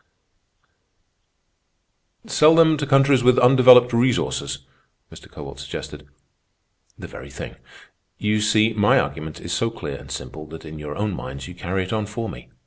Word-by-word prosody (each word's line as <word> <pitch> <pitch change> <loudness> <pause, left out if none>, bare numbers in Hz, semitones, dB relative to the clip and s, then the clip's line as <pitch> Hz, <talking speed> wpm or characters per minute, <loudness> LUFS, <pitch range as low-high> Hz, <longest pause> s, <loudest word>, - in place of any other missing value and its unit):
_" - - -16
"Sell 155 +2 +5
them 160 -1 +5
to 145 -1 -4
countries 135 -1 +4
with 125 +1 +4
undeveloped 125 -1 +6
resources," 115 - -1 0.5
Mr. - - -14
Kowalt - - -10
suggested. 75 0 -8 0.9
"The - - -10
very - - -11
thing. - - -9 0.6
You 105 0 0
see, 110 +1 +2
my 105 -1 +3
argument 80 0 -5
is 85 - -6
so 115 - 0
clear 75 -11 -7
and - - -14
simple 75 0 -8
that 80 +1 -11
in 80 0 -9
your 75 0 -7
own 105 -1 -2
minds 70 -3 -8
you 90 - -10
carry 95 +2 -3
it 90 - -6
on 110 -2 -2
for 115 +2 -5
me. - - -11
105 Hz, 160 wpm, -21 LUFS, 80-125 Hz, 0.9 s, undeveloped